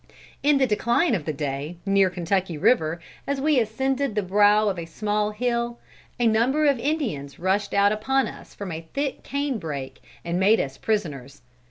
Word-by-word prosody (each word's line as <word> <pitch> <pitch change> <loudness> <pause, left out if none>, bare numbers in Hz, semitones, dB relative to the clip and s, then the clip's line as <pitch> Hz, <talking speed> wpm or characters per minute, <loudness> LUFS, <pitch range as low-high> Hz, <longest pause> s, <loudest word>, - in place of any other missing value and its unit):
"In 290 0 +4
the 270 - +4
decline 235 +7 +2
of 175 -9 -1
the 155 - -1
day, 145 +3 -4
near 195 -1 +4
Kentucky 180 -1 -1
river, 160 -3 +2 0.3
as 280 -1 -1
we 295 -1 +3
ascended 265 +2 -1
the 210 - +1
brow 205 +3 +4
of 190 -4 -1
a 165 - -5
small 210 +4 -1
hill, 235 +2 -1 0.4
a 240 - +2
number 240 +7 +3
of 280 -4 +3
Indians 230 - -2
rushed 195 +3 0
out 200 0 +4
upon 265 +6 +1
us - - -10
from 200 -3 -6
a 160 0 -7
thick 280 -1 -2
canebrake 205 - -4 0.2
and 170 +1 -1
made 210 +4 +4
us 135 -1 -2
prisoners. 145 - -3
210 Hz, 175 wpm, -24 LUFS, 170-250 Hz, 0.4 s, In